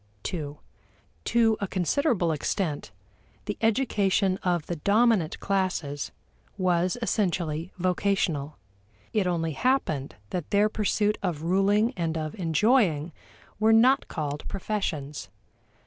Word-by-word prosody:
(ii) 150 -4 -4 0.7
To 225 -2 +3
a 200 - -2
considerable 185 - +1
extent, 155 0 -2 0.6
the 205 - -3
education 205 -5 +2
of 175 -4 0
the 175 - -4
dominant 200 -1 +2
classes 180 -7 -1 0.5
was 180 +1 +1
essentially 175 -6 -1
vocational 180 -5 0 0.6
it 210 -4 +2
only 165 -2 0
happened 155 - 0 0.2
that 175 -4 -3
their 210 +1 +3
pursuits 210 0 0
of 170 -6 -2
ruling 200 +7 +2
and 165 -2 -1
of 155 -1 -3
enjoying 170 - +2 0.5
were 220 +1 +4
not 255 +5 +5
called 150 -3 -4
professions. 180 -8 -3
185 Hz, 110 wpm, -27 LUFS, 160-210 Hz, 0.7 s, not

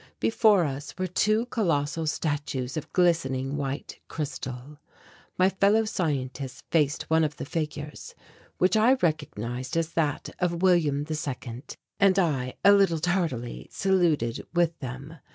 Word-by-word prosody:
Before 215 -5 +4
us 145 +2 -5
were 185 - -1
two 215 +5 +1
colossal 165 -9 0
statues 145 -4 -2
of 155 - -5
glistening 145 -7 +1
white 140 0 -4
crystal. 140 -1 -6 0.6
My 185 - +5
fellow 200 +3 +3
scientists 135 - -3
faced 150 -3 +2
one 160 0 +2
of 150 -1 -1
the - - -5
figures, 150 -2 -5 0.4
which 185 +4 +3
I 220 +4 +5
recognized 130 - -2
as 165 -1 0
that 155 -3 -1
of 175 -1 -1
William 155 -6 +3
II, 130 -6 -4 0.4
and 195 -2 +4
I, 140 -9 0
a 200 - +9
little 195 -4 +4
tardily, 160 -8 -2
saluted 170 -12 +1
with 170 -1 +2
them. 135 +5 -7
155 Hz, 135 wpm, -27 LUFS, 135-180 Hz, 0.6 s, a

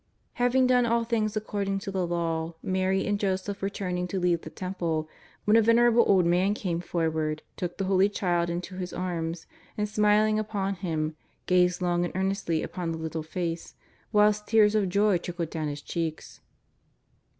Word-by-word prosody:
Having 250 +1 +4
done 250 -1 +4
all 235 0 +2
things 220 -2 -1
according 200 -2 -2
to 195 0 -5
the 185 -2 -1
Law, 165 -1 -2
Mary 190 +1 0
and 205 -1 0
Joseph 195 0 -2
were 195 - 0
turning 180 -3 -3
to 190 +2 -2
leave 175 -2 +1
the - - -8
Temple 170 -4 -3 0.4
when 210 - +4
a 225 - +7
venerable 235 +1 +5
old 185 -3 +4
man 180 +4 +2
came 175 -5 -2
forward, 160 -3 -1
took 175 -1 -4
the 195 - -1
Holy 190 +1 +3
Child 175 -4 0
into 180 +2 -4
his 180 -1 -5
arms, 170 -2 -3 0.3
and, 210 0 0
smiling 210 +1 +3
upon 205 -2 -2
Him, 160 -5 -2 0.3
gazed 180 0 +3
long 175 0 +1
and 175 - -2
earnestly 190 -4 0
upon 175 -2 -4
the 165 - -3
little 160 0 -4
face, 165 +1 -4 0.4
whilst 210 0 +3
tears 215 -2 +5
of 205 -3 +1
joy 200 -1 +3
trickled 170 -2 -4
down 155 -2 -2
his 145 -1 -5
cheeks. 165 -2 -4
185 Hz, 175 wpm, -27 LUFS, 170-210 Hz, 0.4 s, a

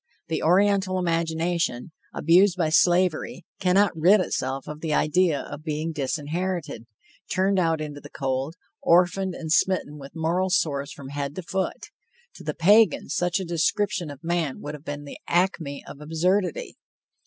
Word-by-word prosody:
the 160 - -1
Oriental 190 +2 +3
imagination, 165 -4 -1 0.2
abused 180 +4 +4
by 165 -3 +1
slavery, 175 0 +2
cannot 190 +2 +3
rid 180 +6 +5
itself 135 -6 -2
of 150 0 -7
the 155 -2 0
idea 160 -1 +2
of 150 - -8
being 155 +1 -2
disinherited, 155 -1 -3 0.4
turned 190 +1 +2
out 165 -3 +1
into 145 -2 -6
the 145 - -11
cold, 135 +2 -3 0.3
orphaned 180 +2 +3
and 160 -2 -6
smitten 160 -4 +1
with 140 +3 -11
moral 170 +4 0
sores 140 -6 0
from 135 -1 -10
head 145 0 -4
to 185 - -5
foot. 190 +2 -3 0.4
To - - -12
the - - -3
Pagan, 205 +3 +4
such 180 +2 0
a 190 - -4
description 175 +1 0
of 145 +2 -10
man 165 -5 -1
would 150 - -6
have 150 +1 -10
been 145 0 -5
the 145 - -10
acme 170 -5 0
of 140 - -11
absurdity. 185 - -1
165 Hz, 155 wpm, -25 LUFS, 150-185 Hz, 0.4 s, rid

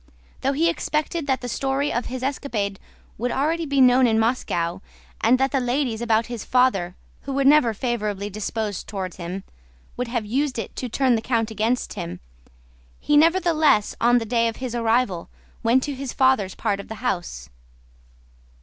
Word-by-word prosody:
Though 270 +1 +1
he 320 +4 +2
expected 315 -1 -1
that 265 -1 +1
the 245 - -5
story 270 +3 -1
of 240 - -2
his 255 0 -5
escapade 230 -8 -2 0.4
would 245 +2 0
be - - -2
already 300 0 0
known 255 0 +6
in 220 -1 +2
Moscow 190 -7 0 0.4
and 235 +3 +5
that 270 0 +2
the 275 - +1
ladies 245 -2 -1
about 225 -1 +2
his 235 -2 -6
father—who 250 0 0
were 275 +1 +1
never 275 -3 +5
favorably 210 -4 -2
disposed 210 -1 -4
toward 190 -4 -4
him—would 170 - -8
have 235 -2 -2
used 265 +5 -1
it 225 - -5
to 250 - -3
turn 260 +2 +2
the 225 - +1
count 225 -2 0
against 225 +3 -1
him, 85 +1 -6 0.8
he 295 - +1
nevertheless 315 - +3
on 240 +1 +5
the 230 - -1
day 230 +1 +2
of 225 - -3
his 255 -2 -5
arrival 230 -6 0 0.3
went 245 +3 +3
to 290 - -3
his 270 -1 -5
father's 260 -8 +2
part 205 -3 -1
of 200 - -8
the 220 - -6
house. 170 - -3
240 Hz, 170 wpm, -23 LUFS, 210-270 Hz, 0.8 s, known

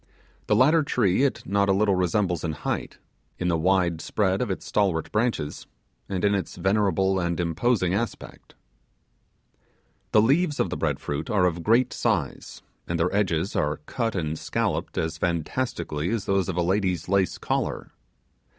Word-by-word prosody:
The - - +3
latter 155 +5 +5
tree 115 -8 +1
it 140 -1 0
not 100 +1 +1
a - - +5
little 100 +1 +3
resembles 90 -1 0
in 80 -2 -1
height, 75 - -4 0.4
in 90 - -1
the 85 - +2
wide 90 -2 +2
spread 95 -2 0
of 125 - -1
its 95 - -4
stalwart 95 -6 0
branches, 110 -10 -1 0.4
and 95 0 -1
in 100 - +3
its 100 -2 -2
venerable 95 0 +1
and 85 -1 -1
imposing 90 +3 +1
aspect. 115 +4 -5 1.6
The - - +5
leaves 150 +5 +2
of - - 0
the - - -1
bread - - -1
fruit 75 0 -4
are 100 -4 +3
of 85 -1 0
great 115 +7 +3
size, 90 - -2 0.2
and 85 -1 -2
their 90 +3 +1
edges 95 -2 0
are 75 0 0
cut 115 +2 -2
and 80 -3 -2
scolloped - - -2
as 80 0 -2
fantastically 85 -2 -2
as 110 -3 -2
those 100 -1 +1
of 90 - -3
a 90 - +2
lady's 90 -2 0
lace 95 0 +1
collar. - - -2
95 Hz, 165 wpm, -25 LUFS, 85-105 Hz, 1.6 s, latter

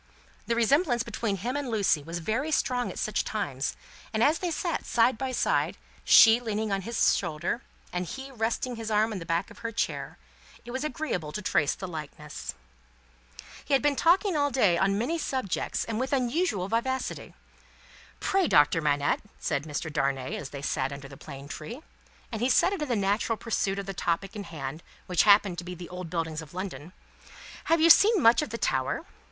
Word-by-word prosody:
The 235 - +1
resemblance 240 +2 +3
between 215 -4 -2
him 240 +8 -3
and 285 -3 -2
Lucie 200 -9 +2
was 165 +4 -5
very 220 - -1
strong 250 -5 0
at - - -8
such 215 - 0
times, 140 -11 -3 0.4
and 220 0 +1
as 305 +5 +3
they 360 - -1
sat 335 0 -2
side 240 +2 +3
by 260 +3 -3
side, 250 - +1 0.3
she 225 0 +8
leaning 220 -2 -2
on 195 0 0
his 230 +3 +2
shoulder, 170 +10 -2 0.3
and 180 0 -2
he 270 +6 -7
resting 235 +1 -2
his 225 -1 -5
arm 215 +1 +2
on 200 - -4
the 165 - -9
back 165 0 -1
of - - -14
her 230 0 -4
chair, 230 - -3 0.5
it 240 - -7
was 260 +1 -3
very 305 - -2
agreeable 180 - -3
to 210 - -3
trace 145 -5 +2
the 190 - -6
likeness. 150 -2 -7 1.1
He 280 - +2
had 270 - +1
been 290 -1 +3
talking 355 +5 +3
all 285 -1 +2
day, 210 -10 +3
on 195 +3 +2
many 275 +10 -1
subjects, 260 - -2
and 225 -1 -3
with 260 +2 -2
unusual 250 - 0
vivacity. 250 +5 -2 0.8
"Pray, 385 -2 +2
Doctor 150 +3 +4
Manette," 145 -1 +1 0.2
said 140 - -1
Mr. 155 +1 -4
Darnay, 135 -2 -1
as 140 - -6
they 140 -1 -8
sat 140 - -1
under 140 0 -8
the 135 - -11
plane 140 0 -10
tree 230 - -7 0.5
and 225 -2 -4
he 245 - +2
said 365 +9 +4
it 385 - -4
in 300 - -1
the 240 - +2
natural 205 +2 0
pursuit 200 -4 -1
of 200 - -4
the 195 - -5
topic 185 +3 -2
in 205 -1 -5
hand, 150 -1 -6 0.2
which 180 -2 +2
happened 200 -3 +5
to - - -5
be 180 +1 -6
the 175 0 -9
old 180 -1 -7
buildings 165 -2 -2
of 155 +2 -13
London 185 -3 -6 0.7
"have 330 0 +3
you 330 +1 +8
seen 425 +5 +6
much 235 -3 +6
of 300 - -3
the 230 - -4
Tower?" - - -1
215 Hz, 200 wpm, -28 LUFS, 170-255 Hz, 1.1 s, she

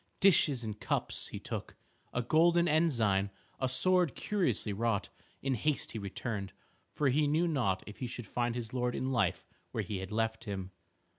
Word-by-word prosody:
Dishes 150 -9 +5
and 105 -1 -5
cups - - -1
he - - -6
took, - - -5 0.4
a 125 - -1
golden 170 +6 +4
ensign 155 -8 +3
and 100 -1 +2 0.3
a 130 - +1
sword 175 +5 +3
curiously 135 - 0
wrought. 105 -2 0 0.3
In 135 -1 +1
haste 150 +4 0
he 110 - -4
returned, 100 -1 -4 0.4
for 145 -2 +1
he 145 +3 +3
knew 160 +4 +2
not 120 - +1
if 105 - -10
he 125 - -2
should 120 -1 -6
find 120 +3 -1
his 120 -1 -5
lord 125 -1 0
in 130 +1 -1
life 95 -8 +1 0.2
where - - -2
he 105 -3 -3
had 95 +1 -6
left 110 +1 -1
him. 95 -3 -4
120 Hz, 180 wpm, -32 LUFS, 105-150 Hz, 0.4 s, Dishes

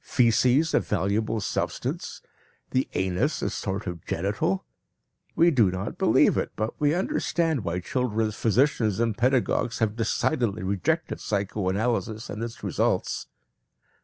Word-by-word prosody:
Faeces 125 +6 +3
a - - +5
valuable 105 +3 0
substance! 100 - -3 0.5
The 130 - +1
anus 95 - 0
a - - 0
sort 100 0 -3
of 85 -3 -5
genital! 95 +1 -1 0.7
We 170 +1 +5
do 115 - +4
not 95 +1 -4
believe - - +4
it, - - -1
but 110 +2 -2
we 150 +2 +3
understand 165 - 0
why 85 0 -2
children's 110 -1 -1
physicians 115 -1 +2
and 115 -2 +1
pedagogues 125 -1 +1
have 110 -2 0
decidedly 115 -2 0
rejected 100 - -1
psychoanalysis 105 +3 -1
and 105 - -5
its 115 0 -6
results." - - 0
110 Hz, 130 wpm, -26 LUFS, 100-125 Hz, 0.7 s, a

